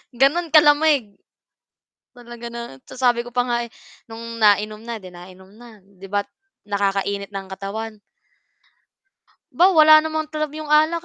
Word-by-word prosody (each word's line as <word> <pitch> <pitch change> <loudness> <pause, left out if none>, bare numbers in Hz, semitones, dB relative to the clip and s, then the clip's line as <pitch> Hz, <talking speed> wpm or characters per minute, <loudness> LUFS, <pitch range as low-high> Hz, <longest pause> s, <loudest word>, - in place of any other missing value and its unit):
Gano'n 295 +7 +2
kalamig. 295 -7 +4 1.0
Talaga 240 -1 -10
na 235 0 -7 0.3
sasabi 245 -2 0
ko 240 - -10
pa 245 0 0
nga, 240 -1 -1
eh, - - -23 0.4
no'ng 230 0 -8
nainom 210 +1 +2
na, 230 0 -6
'di 185 -3 -12
nainom 185 +2 -14
na. 230 -1 -15
'Di 195 0 -15
ba't 205 +1 -2 0.4
nakakainit 200 0 -2
ng 195 -1 -7
katawan. 210 +3 -6 1.5
'Ba, 350 - +3
wala 310 -2 +7
namang 315 -1 -3
talab 305 -1 -4
'yong 310 -1 -8
alak, 315 +3 +2
235 Hz, 140 wpm, -21 LUFS, 200-300 Hz, 1.5 s, wala